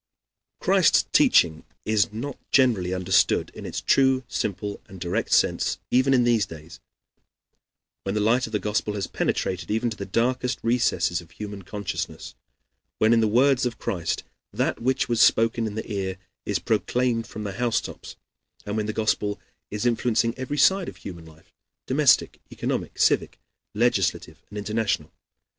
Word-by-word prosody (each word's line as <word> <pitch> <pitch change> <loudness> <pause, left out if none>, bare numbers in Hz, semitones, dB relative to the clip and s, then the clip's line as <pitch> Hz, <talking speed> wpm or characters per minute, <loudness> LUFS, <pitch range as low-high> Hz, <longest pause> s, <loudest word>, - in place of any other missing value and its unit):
Christ's - - +4
teaching 80 -2 +4 0.2
is 105 -2 +2
not 125 +6 -6
generally 115 -10 +3
understood 95 +1 +2
in - - -8
its - - -4
true, 130 -1 +3
simple, 100 0 -3
and 95 - -11
direct 85 0 -2
sense - - +2
even 130 +2 +3
in 125 -2 +4
these 115 -5 +2
days, 80 -1 -11 1.2
when 100 +1 -3
the - - +1
light 115 +4 +2
of - - -11
the 105 - +1
Gospel 105 0 -2
has 100 -2 -2
penetrated 90 0 -2
even 115 +2 0
to 110 - -7
the 100 - -6
darkest 125 +5 0
recesses 105 -8 +1
of 85 - -17
human 105 +1 -8
consciousness; 100 +1 -5 0.6
when, 110 +1 +4
in 115 - +4
the 110 - +3
words 130 +4 +3
of 125 -2 -2
Christ, 85 -4 -2 0.3
that - - -1
which 130 +2 +1
was 120 -2 +1
spoken 115 0 +3
in 105 - -6
the 110 +1 -5
ear 95 -2 -3 0.3
is 100 - +1
proclaimed 115 +1 0
from 105 - -7
the 100 - -3
housetops; 120 +1 -3 0.5
and 105 - -3
when 105 -1 -1
the 110 - -2
Gospel 105 -1 0 0.3
is 105 +3 -4
influencing 115 -1 +1
every 130 +2 -4
side 190 +6 +4
of - - -12
human 85 -4 -9
life 80 0 -19 0.3
domestic, 140 0 +3
economic, - - -3
civic, - - +2 0.4
legislative, - - 0
and 105 - -8
international. 105 +1 -1
110 Hz, 160 wpm, -25 LUFS, 100-120 Hz, 1.2 s, Christ's